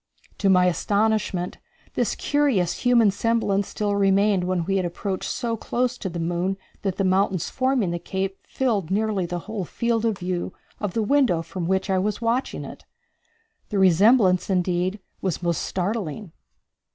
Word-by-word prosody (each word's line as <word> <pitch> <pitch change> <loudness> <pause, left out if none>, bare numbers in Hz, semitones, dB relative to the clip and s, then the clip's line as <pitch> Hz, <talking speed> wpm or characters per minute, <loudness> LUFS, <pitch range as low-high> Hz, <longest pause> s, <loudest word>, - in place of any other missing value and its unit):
To 200 - +2
my 180 -1 +5
astonishment, 200 0 0 0.3
this - - 0
curious 260 - +1
human 235 -4 +4
semblance 205 -2 0
still 205 -1 -1
remained 195 -1 +3
when 180 -2 0
we 195 +2 +1
had 185 - +1
approached 190 +2 -4
so 235 -2 -2
close 245 +2 -1
to 190 - -3
the 170 0 -5
moon 175 +3 -1 0.2
that 195 -3 -1
the 195 - 0
mountains 190 -2 +1
forming 255 -8 +1
the 175 - -2
cape 190 +2 -3
filled 215 -10 -1
nearly 205 -2 0
the 175 +1 -3
whole 215 -3 -4
field 230 +5 -1
of 220 -4 +1
view 180 -1 -3 0.3
of 205 -4 -3
the 225 - +1
window 215 -9 +2
from 175 0 -5
which 190 +1 +1
I 190 -1 +1
was 210 +2 -1
watching 235 +3 -1
it. - - -10 0.9
The 205 - -2
resemblance, 190 +1 +4
indeed, 185 +1 0 0.2
was 185 -2 -2
most 170 -2 0
startling. 190 -1 -3
195 Hz, 165 wpm, -24 LUFS, 180-220 Hz, 0.9 s, my